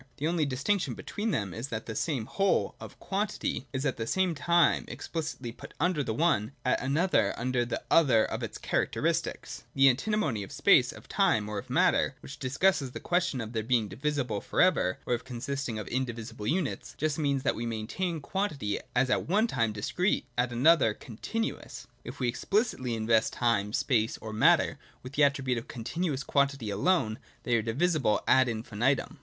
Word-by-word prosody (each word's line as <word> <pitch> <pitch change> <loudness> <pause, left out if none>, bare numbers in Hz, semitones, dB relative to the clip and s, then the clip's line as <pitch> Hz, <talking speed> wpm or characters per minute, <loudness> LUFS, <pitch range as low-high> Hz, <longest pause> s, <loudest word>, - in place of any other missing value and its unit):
The 150 - -3
only 165 -2 +1
distinction 155 +9 0
between 215 +2 -4
them 100 - -1
is 115 +4 -4
that 110 -3 -5
the 110 - -5
same 130 -1 -1
whole 195 - +1
(of - - -11
quantity) 200 -8 -2
is 135 +2 -3
at 135 - -1
one 180 +10 +1
time 170 +3 +3
explicitly 150 -7 -5
put - - -12
under 165 -2 +1
the 115 - -2
one, 140 -7 +1
at 125 - +2
another 155 +8 +2
under 125 0 0
the 120 - -4
other 130 -9 +5
of - - -4
its - - -5
cha - - -1
racteristics. - - -1
(2) - - -21
The 135 0 +7
Antinomy 140 - 0
of 100 - -8
space, - - +4
of - - -13
time, 105 -1 +2
or 105 -1 -3
of - - -11
matter, - - +2
which 140 - -10
discusses 140 +2 +1
the - - -5
question 175 -6 0
of 115 +1 -6
their 110 - 0
being 115 -1 +1
divi 135 +11 -2
sible 125 -8 -2
for - - -4
ever, 170 - +3
or - - 0
of 120 - -2
consisting 130 -1 -4
of 105 - -5
indivisible 115 -4 -4
units, 170 -1 -2
just 155 0 -1
means 140 -3 0
that - - +2
we 120 +1 -4
maintain 150 +10 -3
quantity 145 - -2 0.2
as 125 +1 +2
at - - 0
one 210 +5 +3
time 115 - 0
Dis 105 -1 -4
crete, 180 +3 +1
at 120 0 0
another 130 -2 +4
Continuous. 225 - -5 0.2
If 125 +3 -9
we 125 - 0
explicitly 130 - 0
invest 110 0 +2
time, 110 -4 +1
space, 110 0 +1
or 110 -1 -8
matter 110 - +3 0.2
with 125 +2 -9
the 145 - +3
attribute 135 -3 +2
of 115 - -12
Continuous 135 +4 -3
quantity 140 -7 0
alone, 110 - +1 0.2
they 120 - +1
are 115 - +2
divisible 130 - +1
ad 130 -1 +5
infinitum. 115 +4 -1
130 Hz, 190 wpm, -29 LUFS, 115-160 Hz, 0.2 s, The